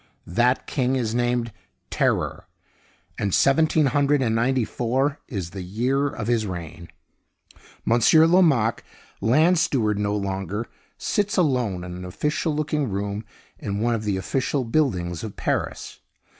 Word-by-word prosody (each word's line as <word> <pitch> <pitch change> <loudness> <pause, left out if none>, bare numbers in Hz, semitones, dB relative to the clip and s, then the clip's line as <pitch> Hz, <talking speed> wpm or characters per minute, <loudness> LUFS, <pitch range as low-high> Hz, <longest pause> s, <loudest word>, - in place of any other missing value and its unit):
That 120 +8 +1
king 130 -2 0
is 115 -4 -1
named 120 -1 0 0.4
Terror, - - 0 0.7
and 100 -3 +1
seventeen 155 +2 +3
hundred 140 0 +2
and 115 -3 +1
ninety 120 +1 +1
four 130 +6 -1
is 95 -7 -5
the 95 - -6
year 125 +10 0
of 115 -6 -5
his 115 -2 +1
reign. 85 -2 -7 1.0
Monsieur 120 +8 +5
Lomaque, 160 -11 +3 0.4
land 155 - +4
steward 110 -11 +1
no 105 0 0
longer, 100 +2 -3 0.3
sits 205 -1 -1
alone 125 - +1
in 90 0 -7
an 90 - -7
official 150 - -2
looking 150 -3 -1
room 100 +2 -3 0.4
in 100 0 -3
one 120 +2 +1
of 110 -2 -2
the 100 -2 -1
official 130 +7 -1
buildings 100 - 0
of 110 -3 -6
Paris. - - -3
120 Hz, 140 wpm, -24 LUFS, 100-140 Hz, 1.0 s, Monsieur